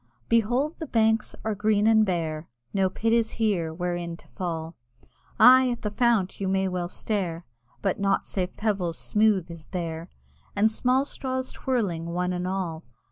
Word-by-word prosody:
Behold 245 +7 +1
the 320 - -5
banks 220 -2 +2
are 220 - 0
green 210 0 +2
and 220 -1 +5
bare, 165 -5 -2 0.2
No 195 -1 +2
pit 225 +4 0
is 230 -1 +2
here 200 -8 0
wherein 175 0 -3
to - - -20
fall: 165 -3 -4 0.6
Aye 255 +3 +8
at 240 - -4
the 210 - -2
fount 225 -4 +1
you 190 - 0
well 190 -2 0
may - - -13
stare, 180 -6 -3 0.4
But 195 -1 0
nought 195 -1 +1
save 180 -2 -3
pebbles 195 -6 -1
smooth 210 -5 +2
is 165 -2 -10
there, 170 -1 -4 0.5
And 215 +2 +3
small 255 +4 +2
straws 260 -2 -3
twirling 195 -11 -2
one 180 +1 -1
and 180 0 -2
all. 180 -4 -3
195 Hz, 165 wpm, -26 LUFS, 175-225 Hz, 0.6 s, Aye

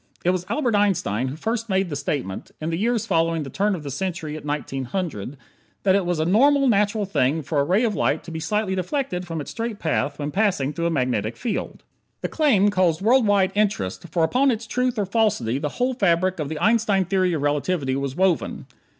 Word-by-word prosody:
It 180 - +4
was 180 -1 -3
Albert 255 -7 0
Einstein 170 - +1
who 130 - -4
first 225 +6 -3
made 190 -2 +1
the - - -2
statement 140 -8 -3
in 155 +2 -3
the - - 0
years 230 +2 0
following 165 -1 +1
the 135 - -8
turn 200 +5 +1
of 160 - -7
the 140 - -5
century 160 0 -3
at 155 - -8
1900 145 - -4 0.5
that 190 - +4
it 195 -2 +1
was 175 -2 0
a 155 - +1
normal, 275 - +4
natural 210 -1 +2
thing 155 -4 +1
for 145 +1 -1
a - - +3
ray 185 +10 +2
of 225 -3 +1
light - - 0
to 170 - -9
be 160 - -4
slightly 210 +3 -1
deflected 185 - -2
from 165 -1 -4
its 145 - -6
straight 230 -2 -4
path 160 -5 -1
when 145 0 -3
passing 185 -9 +1
through 170 +2 -1
a - - +1
magnetic 125 -7 -1
field. 240 -3 -4 0.4
The - - -2
claim 215 -11 +3
caused 185 -3 +1
world 240 +1 +4
wide 200 -2 +3
interest, 190 - -1
for 165 +1 +1
upon 255 +12 +3
its 230 -2 -1
truth 250 +2 -1
or 205 - +1
falsity 185 - +1
the 150 0 -2
whole 250 - -1
fabric 185 -5 +1
of 150 -2 -2
the 160 - -4
Einstein 210 -1 +2
Theory 185 -1 +1
of 150 -3 -2
Relativity 145 -1 0
was 140 -1 -3
woven. 185 -2 0
185 Hz, 220 wpm, -23 LUFS, 150-210 Hz, 0.5 s, It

